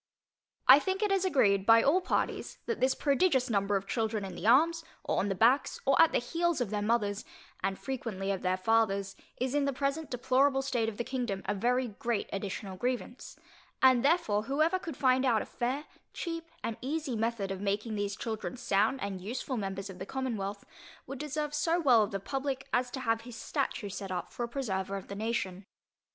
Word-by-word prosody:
I 265 +2 +10
think 380 +6 -1
it 415 - +1
is 390 -1 +2
agreed 200 - +3
by 225 +2 +6
all 330 +7 +4
parties, - - -2
that 460 - -2
this 260 +1 +2
prodigious 275 -4 +2
number 200 -1 +1
of 195 0 -1
children 220 -1 -1
in 190 - -7
the 180 - -4
arms, 325 +7 +4 0.2
or - - 0
on 205 - 0
the 195 - 0
backs, 245 +8 +3
or 275 0 +5
at 330 - +6
the - - +2
heels 335 +6 0
of 235 -5 -2
their 210 -1 -1
mothers, 210 -1 0 0.4
and 195 0 0
frequently 225 -7 -3
of 195 - -2
their 185 0 +1
fathers, 200 -2 +1 0.2
is 255 +1 -1
in 290 -1 +2
the 280 - +1
present 280 +3 -2
deplorable 265 +2 +2
state 245 -4 0
of 210 - -9
the 240 - -1
kingdom, 235 -7 -3
a - - 0
very 245 +5 +1
great 220 +1 -2
additional 195 -1 -4
grievance; 245 +3 -3 0.4
and 260 -2 +5
therefore 245 -9 +2
whoever 310 +8 +2
could 330 -6 -7
find 260 -1 +3
out 235 -5 +3
a - - -10
fair, 260 +5 -2 0.3
cheap 330 -1 -4 0.2
and 230 - -3
easy 285 0 -2
method 220 -3 -1
of 195 0 -4
making 205 +3 -1
these 205 -1 -2
children 225 +4 -4
sound 230 +1 +1
and 195 -2 -4
useful 245 +6 -4
members 195 -2 -3
of 190 -1 -10
the 190 - -5
commonwealth, 215 -7 -3 0.4
would 270 0 -7
deserve 300 0 -3
so 325 +3 +1
well 255 -8 +5
of 210 - +1
the 195 - -3
publick, 270 +5 -3
as 250 +1 +2
to 265 - -5
have 225 -2 +1
his 245 0 -10
statue 210 - -2
set 195 0 -6
up 180 -2 -4
for 240 - -3
a - - -10
preserver 195 -7 -2
of 195 - -10
the 200 - -5
nation. 200 -3 -2
235 Hz, 205 wpm, -30 LUFS, 200-275 Hz, 0.4 s, I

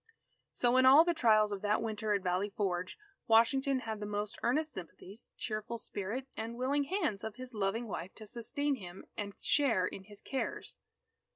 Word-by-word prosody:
So 245 +1 +3
in 260 - +6
all 280 +5 +9
the 345 - +2
trials 215 -7 +4
of 200 -1 -3
that 210 0 +2
Winter 215 -1 -1
at 200 - -2
Valley 185 +3 0
Forge, 190 -4 -2 0.3
Washington 260 +4 +4
had 220 -2 -4
the 210 - -4
most 205 0 -3
earnest 300 +6 +1
sympathies, 190 +4 -9
cheerful 215 +1 -3
spirit, 220 +4 -4
and 230 +1 -5
willing 280 +3 +1
hands 305 - -1
of 220 -1 -5
his 255 +1 -7
loving 215 +3 -1
wife 185 -2 -5
to 220 - -10
sustain 245 +6 -1
him 180 -3 -10
and 200 -1 -5
share 250 -11 +3
in 190 +1 -6
his 205 0 -12
cares. 270 - -4
220 Hz, 180 wpm, -33 LUFS, 205-255 Hz, 0.3 s, all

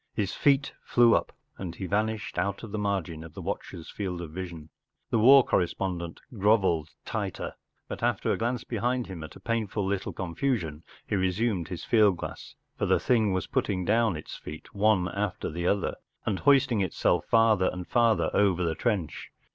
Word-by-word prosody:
His 100 -3 -1
feet 140 0 +2
flew 120 -1 +5
up, - - 0 0.3
and 90 -3 -5
he 95 - -5
vanished 105 +1 -1
out 100 +4 -2
of 110 - -7
the 110 - -3
margin 95 -6 -2
of 80 -2 -12
the - - -6
watchers 80 - -5
field 95 -4 -4
of 85 -3 -6
vision. 85 -3 -7 0.4
The 115 - +3
war 130 +4 +8
correspondent 85 -1 -1
grovelled 95 -7 +2 0.2
tighter, - - -3 0.3
but - - -6
after - - +1
a - - +1
glance 120 +1 -1
behind 125 0 -1
him 90 -4 -7
at 80 - -10
a - - -11
painful 110 -3 -1
little 100 0 -2
con¬ 85 -3 -5
fusion, 85 - -1 0.2
he - - -1
resumed 95 -1 0
his 90 - -6
field 105 -5 +4
glass, - - -8 0.2
for - - +1
the - - +3
thing 110 -5 +2
was 95 -2 -1
putting 90 -3 -1
down 110 -3 +2
its 75 - -8
feet 75 +1 -10
one 100 -3 +3
after 100 0 -3
the 85 +2 -2
other, 100 -1 +1 0.3
and 100 -3 -1
hoisting 135 -6 +4
itself 90 -2 +1
farther 110 -5 +4
and 90 -1 -7
farther 115 -3 +3
over 95 -3 +3
the 85 -2 0
trench. 95 - -2
100 Hz, 185 wpm, -28 LUFS, 85-110 Hz, 0.4 s, war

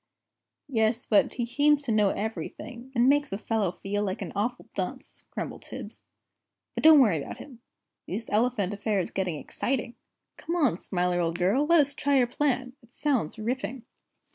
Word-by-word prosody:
"Yes, 230 -2 +1
but 210 - +3
he 240 - -1
seems 290 +4 +3
to 255 - -2
know 210 -2 +4
everything, 235 +4 -5
and 240 +1 +4
makes 290 +1 +3
a 195 - -2
fellow 215 -4 0
feel 200 +2 -2
an 190 -2 -5
awful 235 +5 -2
dunce!" - - -5
grumbled - - -5
Tibbs. - - -8 0.7
"But - - -4
don't 315 -1 +9
worry 200 - +4
about - - -7
him. 250 -5 -12 0.5
This 220 +5 -4
elephant 210 -3 +1
affair 205 +1 -1
is 180 - -3
getting 185 -4 -1
exciting. 245 - -2 0.4
Come 335 +2 -3
along, 275 - +2
Smiler, 180 -1 0
old 165 0 -1
girl, 205 +12 +2
let 335 -1 +6
us 285 0 -1
try 285 -1 +1
your 250 - +5
plan, 250 0 -1
it 235 -1 -23
sounds 250 - -1
ripping!" 250 +2 -3
235 Hz, 170 wpm, -27 LUFS, 200-270 Hz, 0.7 s, don't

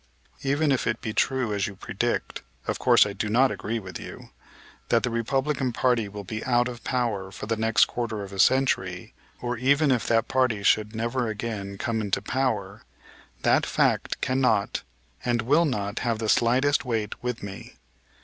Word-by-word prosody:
Even 140 +2 +1
if 130 -3 +1
it 110 0 0
be 110 - -4
true, 130 -4 +1
as 100 -1 0
you 100 - -8
predict - - -3 0.2
of - - -2
course - - +6
I 100 - -4
do 105 +1 -3
not 125 +4 +4
agree 105 +3 -3
with 95 -5 -7
you - - -10 0.6
that 115 -2 +3
the 125 - 0
Republican 130 +3 0
party 115 -3 +1
will 100 0 -7
be 110 +3 -5
out 120 -1 +2
of 120 -1 -8
power 110 -7 -1
for - - -7
the 115 +2 0
next 110 -1 +4
quarter 110 -4 -4
of 100 0 -9
a 95 - -7
century, 95 -7 +2 0.3
or 120 0 -2
even 140 +4 +3
if 125 -3 +1
that 115 -1 +2
party 125 -6 +1
should 105 +1 +2
never 120 +2 -1
again 105 -2 -4
come 110 +2 -1
into 100 -2 0
power, 130 0 -2 0.6
that - - +4
fact - - +1
cannot 130 -6 +1 0.4
and 120 -2 0
will 150 +8 +4
not 105 -7 -2
have 115 -2 0
the 110 -1 -2
slightest 130 +6 +3
weight 115 -5 -3
with 125 -2 -3
me. 100 -1 -8
115 Hz, 180 wpm, -26 LUFS, 105-130 Hz, 0.6 s, course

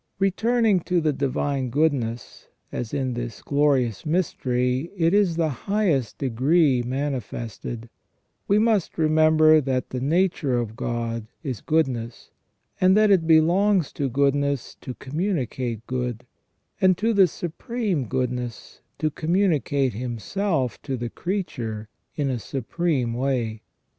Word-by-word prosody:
* - - -50
Returning 220 +1 +2
to 175 +1 0
the 155 -2 +1
divine 140 -1 -1
goodness, 125 -5 -1 0.2
as 120 -2 -4
in 130 -3 -1
this 120 -2 -6
glorious 140 -7 +1
mystery 130 -4 0
it 165 +1 +2
is 200 -4 +3
in - - -7
the 165 -2 +2
highest 150 - 0
degree 135 +2 +2
manifested, 120 -3 -4 0.6
we 200 - +4
must 215 -4 +1
remember 155 0 +5
that 130 -2 -2
the 130 - -2
nature 155 -3 +1
of 115 -2 -3
God 115 -2 -3 0.2
is 130 -7 -4
goodness, 130 -7 -1 0.5
and 185 +2 +5
that 215 -1 +5
it 175 -5 +3
belongs 175 +2 +4
to 140 -2 -1
goodness 140 0 0
to 125 - -6
communicate 130 - -3
good, 125 -1 -3 0.6
and 185 -2 +5
to 225 +3 +1
the 195 -3 +6
Supreme 180 - -3
Goodness 125 -1 -4 0.2
to 155 - 0
communi 170 0 +1
cate 135 -3 0
Himself 125 - -2
to 135 -3 -3
the 120 0 -4
creature 115 - -4 0.3
in 140 -3 0
a 125 - -2
supreme 130 - -1
way. 120 -4 -1
140 Hz, 135 wpm, -24 LUFS, 125-170 Hz, 0.6 s, the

